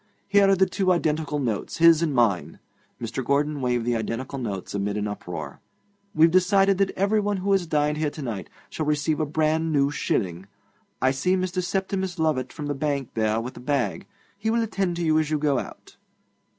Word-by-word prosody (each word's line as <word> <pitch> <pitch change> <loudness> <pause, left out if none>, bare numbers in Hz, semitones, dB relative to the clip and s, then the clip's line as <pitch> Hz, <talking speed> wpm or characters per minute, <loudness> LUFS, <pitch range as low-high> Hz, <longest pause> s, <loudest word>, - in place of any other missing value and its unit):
Here 200 -1 +4
are 195 - +5
the 190 +1 +4
two 190 -1 0
identical 155 -3 0
notes, 120 -7 -2
his 165 -1 +6
and 165 -3 +1
mine.' 100 - +1 0.4
Mr. 120 +3 -4
Gordon 145 +2 0
waved 125 -2 0
the 120 0 +1
identical 115 +5 -3
notes 100 -6 -5
amid 100 +1 -2
an 105 0 -1
uproar. 85 -8 -6 0.6
'We've 160 +1 +5
decided 195 +2 +3
that 195 -1 +3
everyone 205 +1 +1
who 195 +2 -1
has 190 -3 +2
dined 150 -1 +1
here 155 -1 +1
to 150 - -9
night 110 -7 -5 0.2
shall 155 - -3
receive 150 +1 0
a 155 - 0
brand 160 +2 +1
new 140 -1 +2
shilling. 95 -9 -2 0.6
I 130 - +4
see 180 +8 +1
Mr. 185 0 -1
Septimus 190 0 -2
Lovatt 150 -6 0
from 150 - -6
the 145 - -1
bank 140 -2 -2
there 110 0 +1
with 120 +3 -6
a - - -7
bag. 140 +7 -1 0.3
He 220 +2 -1
will 230 +1 +2
attend 195 -5 -1
to 170 - -3
you 155 -1 +3
as 155 -2 -1
you 155 - +1
go 145 -3 +1
out. - - -10
150 Hz, 200 wpm, -25 LUFS, 125-185 Hz, 0.6 s, his